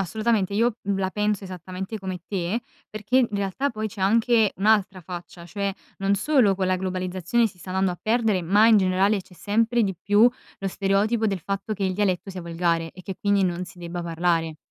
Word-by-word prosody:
assolutamente 210 +1 0
io, 230 +2 +1
mhmm, 195 -1 -1
la 190 -1 -1
penso 210 -1 -1
esattamente 185 +3 -6
come 190 -2 -5
te, 195 +4 -2 0.3
perché 215 +4 0
in 245 - +3
realtà 200 +7 -1
poi 215 -1 -3
c'è 210 -1 -9
anche 225 +2 +3
un'altra 200 -2 +2
faccia, 175 0 -9
cioè, 200 +3 -2 0.3
non 195 +1 +2
solo 215 -4 +3
con 190 -1 0
la 185 0 +2
globalizzazione 185 +4 0
si 185 -3 -10
sta 185 - -9
andando 190 -1 +1
a 175 - -9
perdere, 220 -5 +1
ma 205 +6 +4
in 220 -2 +7
generale 190 +2 +2
c'è 180 - -19
sempre 225 +5 +1
di 195 - -2
più 205 +6 +4 0.3
lo 195 - -2
stereotipo 205 +4 +1
del 195 -2 -1
fatto 195 +5 -3
che 200 -2 -2
il 185 - 0
dialetto 195 -1 0
sia 185 -2 -7
volgare 165 -1 -1
e 185 - -13
che 190 - -5
quindi 200 -1 +2
non 180 0 -1
si 180 - -14
debba 175 0 -5
parlare. 165 -1 0
195 Hz, 205 wpm, -24 LUFS, 185-215 Hz, 0.3 s, in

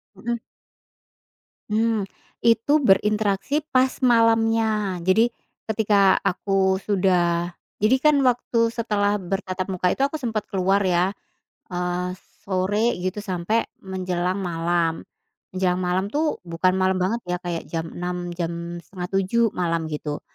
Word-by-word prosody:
Mhm. 235 0 -3 1.3
Mmm. 220 -1 +1 0.4
itu 230 +6 +4
berinteraksi 210 0 +2 0.2
pas 255 0 +5 0.2
malamnya, 225 -5 +2
jadi 220 +7 +3 0.3
ketika 205 -3 +3
aku 190 0 +1
sudah 180 -3 +1 0.3
jadi, 215 +5 +5
kan, 300 -1 +6
waktu 235 -2 +2
setelah 210 -3 0
bertatap 185 0 -3
muka 180 0 +1
itu - - -4
aku 280 +3 -3
sempat 225 -4 -2
keluar, 195 +1 +2
ya, 180 0 +2 0.6
eee, 180 0 -2 0.3
sore 205 +5 +1
gitu 185 +2 -2
sampe 195 +3 -1 0.2
menjelang 185 -1 -2
malam, 170 -2 0 0.5
menjelang 185 -1 0
malam, 180 +2 0
tuh, 305 +1 0
bukan 170 +2 +2
malam 185 0 +2
banget, 205 +6 0
ya, 180 0 -1
kayak 170 -2 -3
jam 165 -1 -3
06:00, 175 0 -3
jam 170 0 -4
06:30 195 +4 -1
malam 165 -2 -1
gitu, 150 0 -4
190 Hz, 120 wpm, -23 LUFS, 180-220 Hz, 1.3 s, kan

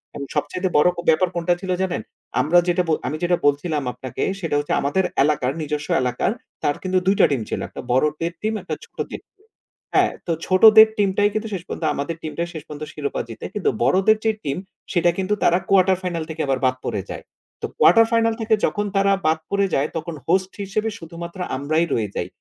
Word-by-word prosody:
এবং 140 - -5
সবচাইতে 150 +6 -1
বড় 150 - +5 0.2
ব্যাপার 170 +3 +4
কোনটা 170 +1 +1
ছিল 190 - -3
জানেন? 185 -2 -1 0.4
আমরা 155 +6 +3
যেটা 175 +1 +2 0.3
আমি 155 - -2
যেটা 175 0 +2
বলছিলাম 145 +1 0
আপনাকে 130 -2 -7 0.2
সেটা 165 -5 -2
হচ্ছে 145 - -2
আমাদের 145 +7 +1 0.2
এলাকার 140 -3 +1
নিজস্ব 150 -1 -3 0.2
এলাকার 125 +8 0 0.3
তার 145 - +1
কিন্তু 185 0 +1
২টা 195 +1 +5
টিম 135 -4 0
ছিল। - - -2
একটা - - -8
বড় 130 +4 +4 0.2
দের 170 +1 -1
টিম 215 +1 -1
একটা - - -4
ছোট - - -22
দের - - -6
টিম। - - -75 0.6
হ্যাঁ, - - +4 0.2
তো - - 0
ছোটদের 220 +3 +8
টিমটাই 205 0 +2
কিন্তু 215 +1 -2
শেষ 180 -3 -4
পর্যন্ত 165 - -4
আমাদের 145 +4 -3
টিমটাই 170 +2 -3
শেষ 160 -3 -7
পর্যন্ত 150 0 -7
শিরোপা 145 -2 -3
জিতে 115 - -8
কিন্তু 205 - +1
বড়দের 190 - +4
যে 220 - +4
টিম 140 -1 -2 0.4
সেটা 175 -2 +3
কিন্তু 190 +2 0
তারা 175 - +4
কোয়ার্টার 190 -1 +4
ফাইনাল 170 -3 -2
থেকে 160 0 -4
আবার 135 -1 +1
বাদ 130 - +2
পড়ে 100 - -2
যায়। - - -7 0.4
তো - - -2
কোয়ার্টার 225 +6 +6
ফাইনাল 230 0 +3
থেকে 220 0 +3
যখন 205 0 -1
তারা 195 0 +3 0.2
বাদ 160 0 +2
পড়ে 200 0 +2
যায় 140 +2 +1
তখন 165 0 -5
হোস্ট 185 +2 +2
হিসেবে 215 +3 -1
শুধুমাত্র 170 +2 -8 0.2
আমরাই 155 +5 +1
রয়ে 110 -3 0
যাই। - - -2
170 Hz, 200 wpm, -22 LUFS, 150-195 Hz, 0.6 s, ছোটদের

